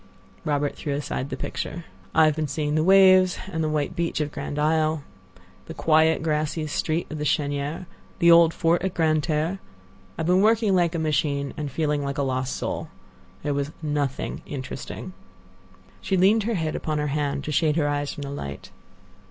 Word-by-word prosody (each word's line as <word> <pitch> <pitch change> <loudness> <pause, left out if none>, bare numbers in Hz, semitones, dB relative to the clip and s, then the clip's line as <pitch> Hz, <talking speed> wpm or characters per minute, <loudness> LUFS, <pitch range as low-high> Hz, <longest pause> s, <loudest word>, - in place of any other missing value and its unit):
Robert 145 -1 0
threw 145 -2 -3
aside 140 -1 -3
the - - -4
picture. 170 0 -5 0.3
"I've 155 -2 +5
been 155 -1 -1
seeing 150 +1 -2
the 155 0 +2
waves 185 0 +6
and 160 -2 -1
the 155 - 0
white 150 -2 -1
beach 170 -2 -1
of 150 -1 -1
Grand 140 +1 -5
Isle; 155 0 +1 0.6
the 165 - -7
quiet, 160 0 +3
grassy 155 0 -1
street 155 +2 -1
of 155 - -5
the - - -2
Chênière; 145 +3 -1 0.3
the 170 -2 +5
old 170 -1 +7
fort 165 0 +1
at 190 -1 -2
Grande 155 -2 +2
Terre. 160 +5 -1 0.6
I've 160 - -2
been 180 +2 +4
working 220 -1 +3
like 175 -2 +2
a - - 0
machine, 145 -3 0
and 150 -1 -4
feeling 150 0 0
like 140 +1 -3
a 140 - +1
lost 130 -1 -1
soul. - - -4 0.5
There 145 0 0
was 140 +1 -2
nothing 145 -3 -2
interesting." 135 +6 -6 0.9
She 190 - 0
leaned 205 +4 +4
her 230 0 0
head 160 -3 -2
upon 155 -1 -2
her 150 - 0
hand 145 -2 -1
to 150 - -4
shade 150 0 +2
her 155 -3 +1
eyes 145 0 -1
from 145 - -7
the 140 - -5
light. 70 - -7
155 Hz, 185 wpm, -24 LUFS, 145-165 Hz, 0.9 s, old